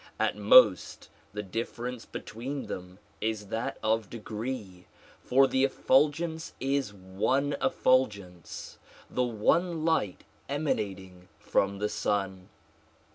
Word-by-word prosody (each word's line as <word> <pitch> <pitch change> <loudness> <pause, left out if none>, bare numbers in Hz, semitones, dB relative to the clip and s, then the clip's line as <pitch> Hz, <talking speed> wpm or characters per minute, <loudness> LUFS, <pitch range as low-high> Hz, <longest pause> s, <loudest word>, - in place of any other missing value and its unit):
At - - +1
most - - +5 0.2
the 105 0 -4
difference 115 +4 -4
between 130 +6 -6
them 90 0 -7 0.2
is 110 -2 -2
that 115 +1 -3
of 110 -2 +1
degree, 110 -4 -6 0.4
for 135 +2 +5
the 130 0 +1
effulgence 155 +4 +1
is 135 -4 0
one 105 +9 -1
effulgence, 100 - 0 0.3
the 125 - 0
one 155 +9 +1
light 160 - 0 0.3
emanating 95 -11 -3
from 100 0 0
the 105 +1 0
Sun. 95 -3 -2
115 Hz, 105 wpm, -29 LUFS, 100-135 Hz, 0.4 s, most